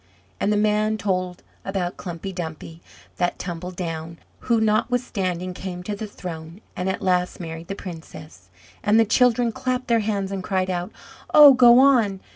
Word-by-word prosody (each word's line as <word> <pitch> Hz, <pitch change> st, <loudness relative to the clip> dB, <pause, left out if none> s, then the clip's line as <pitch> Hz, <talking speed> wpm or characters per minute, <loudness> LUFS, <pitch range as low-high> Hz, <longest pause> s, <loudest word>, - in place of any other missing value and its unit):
And 205 Hz, -, +1 dB
the 210 Hz, -, +2 dB
man 215 Hz, +1 st, +1 dB
told 185 Hz, -3 st, -2 dB, 0.2 s
about 190 Hz, -2 st, -3 dB
Klumpy 180 Hz, +2 st, -7 dB
Dumpy 165 Hz, -1 st, -7 dB, 0.4 s
that 175 Hz, -1 st, 0 dB
tumbled 180 Hz, 0 st, -6 dB
down, 165 Hz, -2 st, -5 dB, 0.2 s
who 235 Hz, -2 st, +1 dB
notwithstanding 210 Hz, -5 st, -1 dB
came 180 Hz, -1 st, -7 dB
to 205 Hz, +2 st, -4 dB
the 215 Hz, +1 st, -6 dB
throne, 165 Hz, -3 st, -8 dB, 0.2 s
and 180 Hz, +1 st, -2 dB
at 190 Hz, -, -3 dB
last 180 Hz, -1 st, 0 dB
married 165 Hz, -1 st, -7 dB
the 195 Hz, -, -4 dB
princess. 160 Hz, -, -11 dB, 0.3 s
And 210 Hz, +2 st, +3 dB
the 225 Hz, -, +5 dB
children 240 Hz, +1 st, +3 dB
clapped 255 Hz, 0 st, -3 dB
their 230 Hz, -1 st, +4 dB
hands, 200 Hz, -2 st, -2 dB
and 195 Hz, -1 st, -4 dB
cried 185 Hz, 0 st, -1 dB
out, 175 Hz, 0 st, -3 dB, 0.4 s
"Oh, 295 Hz, -2 st, +10 dB
go 245 Hz, -2 st, +7 dB
on! 240 Hz, -8 st, +4 dB
190 Hz, 165 wpm, -23 LUFS, 175-220 Hz, 0.4 s, Oh